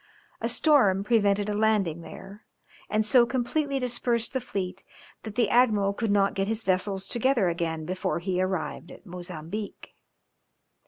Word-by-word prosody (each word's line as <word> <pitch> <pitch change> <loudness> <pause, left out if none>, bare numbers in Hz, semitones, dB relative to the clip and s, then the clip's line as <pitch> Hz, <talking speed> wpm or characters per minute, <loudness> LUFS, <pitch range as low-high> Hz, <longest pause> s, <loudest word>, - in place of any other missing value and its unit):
A - - -1
storm 210 -12 +3
prevented 205 -2 +2
a 210 - -1
landing 205 -6 +1
there, 195 +5 -11 0.5
and 215 0 +1
so 235 +2 +5
completely 275 +3 -1
dispersed 240 -2 -1
the 260 - -1
fleet 190 -5 -5 0.4
that 220 -2 -8
the 235 -3 +2
admiral 210 -4 +3
could 225 +1 -2
not 200 -1 +3
get 195 0 -1
his 225 +1 -2
vessels 190 +1 0
together 240 -5 +2
again 165 -2 -3
before 185 +2 -2
he 180 +1 -1
arrived 185 -2 -3
at - - -13
Mozambique. 180 +2 -7
205 Hz, 150 wpm, -27 LUFS, 185-235 Hz, 0.5 s, so